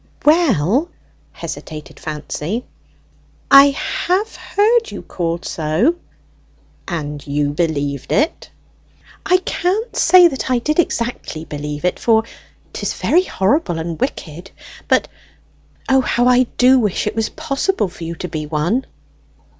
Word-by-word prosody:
"Well," 290 - +3 0.4
hesitated 155 -1 -8
Fancy, 155 +8 -4 0.9
"I 275 +1 +10 0.4
have 395 +5 0
heard 450 +3 +1
you - - -8
called 170 -1 -3
so." 160 - +1 0.9
"And 150 -4 -5
you 145 0 0
believed 145 -4 -2
it?" 300 +3 0 0.8
"I 365 -1 +5
can't 385 +5 -2
say 360 -1 +7
that 270 -4 -4
I 255 - +3
did 305 +7 -1
exactly 235 - -2
believe 150 +1 -5
it, 180 - 0
for 225 -1 +3 0.5
'tis - - -3
very 360 +3 +2
horrible 195 - 0
and 165 +2 -5
wicked; 180 - -4 0.4
but, - - +2 0.8
O, 265 0 +4
how 245 -1 +1
I 250 0 +4
do 255 +1 +6
wish 210 -6 0
it 210 - -2
was 225 -1 0
possible 280 - -1
for 175 -1 -11
you 165 +1 -5
to 180 - -5
be 155 -2 -5
one!" 170 - -1
215 Hz, 130 wpm, -18 LUFS, -, 0.9 s, I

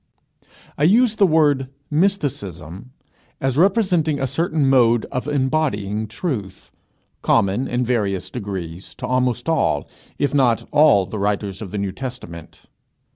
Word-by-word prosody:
I - - +1
use 225 +5 +4
the 200 - +5
word 145 -5 +2 0.2
mysticism 125 - -2 0.5
as 135 -1 -1
representing 175 -4 +2
a 135 - 0
certain 160 +1 0
mode 120 -4 +4
of 125 +3 -3
embodying 130 -8 -1
truth, 110 - -5 0.5
common, 100 +7 +1
in 125 0 -1
various 100 -7 -1
degrees, 95 -6 -6
to - - -6
almost 125 0 0
all, 155 - +1 0.3
if 145 - 0
not 125 -5 +2
all, 145 -10 +5
the 105 - -6
writers 100 -1 -2
of 105 - -6
the 105 - -5
New 100 -1 -2
Testament. 95 - -8
125 Hz, 130 wpm, -21 LUFS, 100-150 Hz, 0.5 s, the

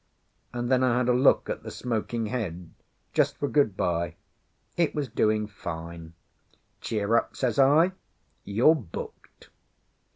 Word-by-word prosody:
And 120 +1 -3
then 130 -1 +4
I 125 -1 +3
had 125 0 +1
a - - +5
look 130 +3 +4
at - - -4
the - - -8
smoking 115 -1 -3
head, 90 -7 -4 0.4
just - - +2
for 145 - -1
good 140 -10 +2
bye. 85 -1 -1 0.6
It 170 -2 +1
was 145 -3 -1
doing 110 -1 +1
fine. 85 -4 -8 0.7
"Cheer 110 0 0
up," - - +1
says 125 -1 -1
I. 150 +7 +5 0.5
"You're 115 +10 +4
booked." 115 - -9
115 Hz, 140 wpm, -27 LUFS, 95-130 Hz, 0.7 s, a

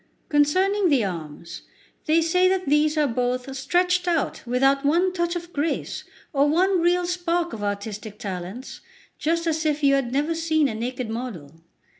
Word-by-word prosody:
Concerning 370 +7 +3
the 265 -8 +3
arms, 170 -1 -7 0.5
they 325 +2 +4
say 360 +3 +3
that 375 0 +1
these 300 +2 +2
are 300 - +3
both 250 +1 -2
stretched 360 +6 +1
out 335 -4 0
without 270 +3 +2
one 345 +6 +2
touch 345 -1 -1
of 345 0 -6
grace 300 +3 -2 0.3
or 280 0 +3
one 365 +3 +2
real 350 +1 +2
spark 350 -1 -1
of 220 - -6
artistic 205 +1 -4
talents, 195 +3 -7 0.4
just 335 +2 0
as 320 -1 0
if 300 -1 0
you 275 -1 +5
had 270 -3 0
never 290 +5 0
seen 315 -2 +1
a 235 - -3
naked 245 +2 -4
model. 190 - -7
295 Hz, 165 wpm, -24 LUFS, 245-345 Hz, 0.5 s, you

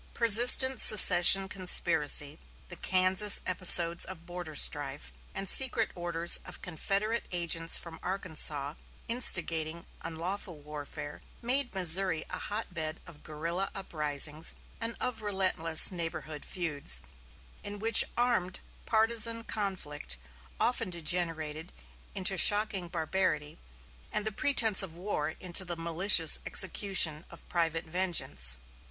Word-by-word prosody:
Persistent 240 +3 +4
secession 195 -1 +7
conspiracy, 185 - +2 0.3
the - - -8
Kansas 185 +3 +3
episodes 175 -2 +5
of 170 -3 -9
border 175 -3 -10
strife, 145 0 -1 0.2
and 195 0 -6
secret 240 -1 +1
orders 175 -1 +3
of - - -12
Confederate 200 +6 -4
agents 165 -2 +1
from 165 -1 -12
Arkansas 155 -6 -4 0.3
instigating 170 -8 0 0.2
unlawful 175 +2 -7
warfare, 145 0 -11 0.2
made 250 -1 0
Missouri 180 -2 +1
a 180 - -7
hotbed 175 -7 -7
of 170 -4 -15
guerrilla 165 +5 -6
uprisings 155 -3 -4 0.2
and 230 0 -5
of 250 -3 -5
relentless 185 -6 +1
neighborhood 160 -4 -7
feuds, 160 -6 -4 0.6
in 205 0 -8
which 225 +1 +6
armed 235 -7 -2 0.3
partizan 230 +1 +1
conflict 185 - -5 0.4
often 230 -4 -2
degenerated 165 -1 -3 0.4
into 190 -1 +4
shocking 205 -3 +2
barbarity, 165 -3 -4 0.5
and 210 - -4
the 220 - -3
pretense 225 -3 +3
of 180 -4 -7
war 175 -4 -5
into 185 +1 +1
the 175 -2 -7
malicious 165 0 +2
execution 190 -5 +1
of - - -15
private 165 -1 -3
vengeance. 160 - -2
180 Hz, 110 wpm, -28 LUFS, 160-200 Hz, 0.6 s, secession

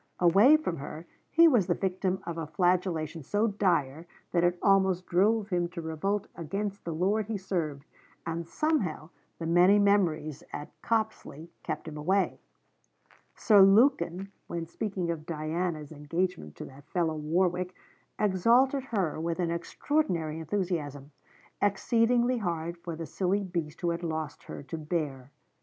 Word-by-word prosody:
Away 200 - +6
from 245 - -3
her, 155 +4 -7 0.2
he 335 +1 +6
was 235 - +3
the 175 - +2
victim 190 0 -1
of 170 - -4
a 165 -2 -4
flagellation 170 -1 0
so 205 - 0
dire 170 -7 0 0.2
that 175 -1 +2
it 175 0 +2
almost 190 -2 +3
drove 205 +4 +2
him 175 -2 0
to 170 0 -7
revolt 185 +6 -1
against 195 +4 -4
the 170 - -3
lord 195 +6 0
he 220 -2 -2
served, 165 -7 -3 0.4
and 165 0 -3
somehow 190 - -1 0.3
the 165 - -5
many 175 +4 +5
memories 170 -8 +2
at 145 - -7
Copsley 215 -8 -2
kept - - -5
him 155 -1 -7
away. 190 +6 +1 1.0
Sir 210 -3 +5
Lukin, 195 -3 +4 0.2
when 170 -1 -4
speaking 180 0 -3
of 155 -2 -6
Diana's 160 -1 -3
'engagement 155 - -3
to - - -7
that 140 +3 -15
fellow 170 -3 0
Warwick,' 180 +4 0 0.4
exalted 235 +7 +3
her 195 - -1
with 170 +1 -2
an 170 -2 0
extraordinary 170 - -1
enthusiasm, 160 -5 -3 0.5
exceedingly 235 +4 +2
hard 170 -3 -2
for 170 -1 -6
the 165 +1 -5
silly 190 +6 0
beast 170 -4 -4
who 175 - +1
had 170 0 -3
lost 160 -3 -4
her - - -8
to 160 +4 -6
bear. 150 -5 -3
175 Hz, 150 wpm, -29 LUFS, 160-200 Hz, 1.0 s, Away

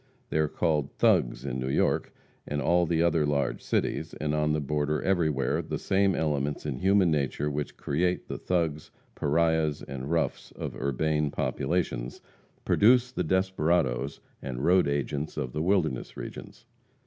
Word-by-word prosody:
They 80 - +1
are 80 - +3
called 75 -3 0
"thugs" - - +2
in 65 - -3
New 65 +1 -2
York - - +1 0.4
and 75 - -2
all 85 +5 +2
the 85 0 +2
other 85 -2 +3
large 70 -3 0
cities; - - -1
and 75 -1 -2
on 75 0 +1
the 75 - +1
border 75 +1 -1
everywhere, 80 -9 +1
the - - -4
same 95 -1 +2
elements 75 -2 -1
in 70 -4 -3
human 95 -2 +4
nature 75 0 0
which 75 0 -4
create 90 +5 -1
"the - - -5
thugs, 80 -4 -1 0.2
pariahs 80 0 +1
and 65 +1 -6
roughs," 85 -1 -1
of - - -5
the - - -9
urbane 75 +2 0
populations, 65 -5 -2 0.5
produce 125 +3 +4
the 90 - -2
desperadoes 80 -7 0 0.2
and 65 +1 -4
road 90 0 +4
agents 70 +2 -2
of 65 -4 -3
the 75 - -2
wilderness 80 -8 0
regions. - - -9
75 Hz, 160 wpm, -28 LUFS, 70-85 Hz, 0.5 s, human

